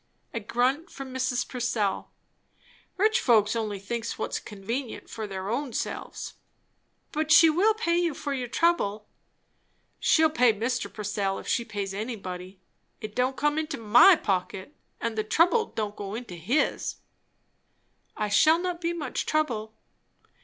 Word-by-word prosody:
A 230 - -2
grunt 255 - 0
from 270 -2 -8
Mrs. 255 -1 -1
Purcell. 235 -6 -1 0.9
"Rich 435 +4 +3
folks 220 - +3
only 215 -3 -2
thinks 230 +4 -4
what's - - -2
convenient 230 +5 -6
for 220 -1 -5
their 190 -1 -5
own 250 +3 -2
selves!" - - -4 0.8
"But 310 0 -1
she 330 -1 +8
will 410 +7 +3
pay 345 -6 +1
you 340 -4 0
for 285 - -3
your 255 -2 -3
trouble." 220 -9 +1 0.9
"She'll 315 -1 +4
pay 250 -7 +4
Mr. 240 +4 -2
Purcell, 205 -2 -2
if - - -9
she 235 - +1
pays 200 -3 -4
anybody. 195 -4 -6 0.4
It 215 -1 -7
don't 255 +1 0
come 295 +1 +1
into 315 0 -3
my 235 - +7
pocket, 195 - -3 0.2
and 230 -1 -2
the 215 - 0
trouble 360 - +3
don't 210 -1 -4
go 200 0 -6
into 235 -5 -7
his'n." 205 - 0 1.2
"I 210 - 0
shall 310 +11 +5
not 355 0 -3
be 340 0 0
much 300 -6 -3
trouble." 225 -8 -1
240 Hz, 145 wpm, -27 LUFS, 210-310 Hz, 1.2 s, she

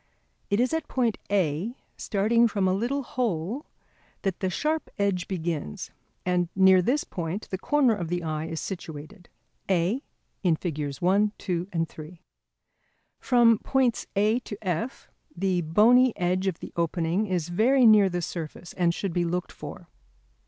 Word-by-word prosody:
It 200 - +1
is 250 +5 +2
at 320 -2 -1
point 240 -4 0
A, 190 - 0 0.2
starting 230 +3 +2
from 200 -3 0
a 185 - +2
little 245 +8 -1
hole, 235 - -2 0.6
that 195 -3 -1
the 190 - 0
sharp 305 - -1
edge 200 -3 0
begins; 165 - -4 0.3
and 180 -1 +1
near 190 -1 +6
this 260 +11 +1
point 175 +4 -5
the 190 - -2
corner 280 0 +3
of 180 -6 -3
the 175 +1 -2
eye 155 -1 -2
is 160 -1 -4
situated: 160 -2 -8 0.4
A, 190 +7 +1 0.6
Figs. 150 -4 -4
1, 200 +3 +3
2, 180 -1 -2 0.2
3. 160 +2 -11 1.0
From 235 -3 +4
points 260 -3 +1
A 215 +4 +3
to 210 -4 -8
F 180 - -3 0.3
the 185 -1 0
bony 225 +10 +4
edge 185 +1 0
of 185 -3 -2
the - - -8
opening 170 +4 0
is 175 -4 -1
very 245 +8 +4
near 210 -3 +7
the 175 -1 -3
surface 170 +1 -6
and 170 -2 +1
should 195 -4 -3
be 175 - +1
looked 175 +1 -2
for. - - -9
190 Hz, 150 wpm, -26 LUFS, 170-225 Hz, 1.0 s, near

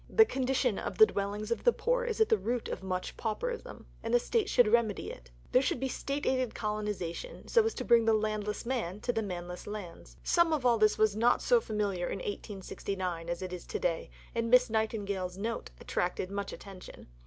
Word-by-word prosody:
The 445 - +7
condition 260 - 0
of - - -4
the 435 - +10
dwellings 205 - -3
of 235 - -1
the 485 - +6
poor - - 0
is 465 -2 -2
at 440 - +4
the - - +5
root 235 +4 -2
of - - -4
much 185 -1 -3
pauperism, 465 - -4 0.2
and 230 - -3
the 245 - +5
State 425 - 0
should 245 -3 +5
remedy 220 -2 +1
it. 60 0 -12 0.2
There 255 - +5
should 260 - 0
be 265 +1 -1
State 280 +2 -3
aided 255 -3 0
colonization, 210 - -4
so 465 - +5
as 450 - -1
to 255 - -4
bring 235 -1 +5
the 225 -1 +5
landless 215 0 -2
man 225 -7 -2
to 245 - 0
the 225 - 0
manless 180 -3 -6
lands. 205 -5 -8
Some 340 -2 +3
of 285 -5 -1
all 235 -2 +4
this 215 0 +4
was 215 -2 +3
not 235 +3 +4
so 485 -1 +4
familiar 200 - -1
in - - -3
1869 190 -3 -4
as 170 +2 -3
it 185 -1 -5
is 180 - -7
to - - -2
day, 170 -2 -1 0.2
and 230 0 -1
Miss 250 -1 +5
Nightingale's 200 -4 -1
"Note" 225 +3 -3
attracted 180 +1 -2
much 200 0 -3
attention. 195 -2 -10
215 Hz, 210 wpm, -31 LUFS, 195-250 Hz, 0.2 s, the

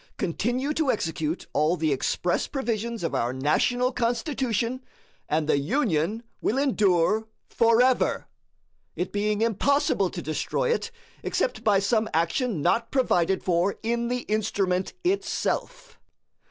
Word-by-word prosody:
Continue 240 - -1
to 310 -3 0
execute 160 -6 -1
all 155 +4 +2
the 155 -2 0
express 175 +6 -1
provisions 235 -4 -3
of 165 - -2
our 120 +1 0
National 200 - +1
Constitution, 245 0 -1 0.5
and 155 0 0
the 145 - +3
Union 205 - 0 0.2
will 235 - 0
endure 215 -5 +2 0.2
forever 240 +2 +3 0.7
it 180 - -3
being 210 +1 0
impossible 230 -2 +2
to 175 - -6
destroy 175 - -1
it 470 -1 -1 0.3
except - - -1
by 205 -2 +4
some 220 +3 +1
action 170 - 0
not 230 +6 +2
provided 190 -9 +1
for 180 +2 +1
in 235 +1 0
the 250 +1 -1
instrument 200 -4 -1
itself. 395 +5 -2
220 Hz, 125 wpm, -26 LUFS, 175-250 Hz, 0.7 s, by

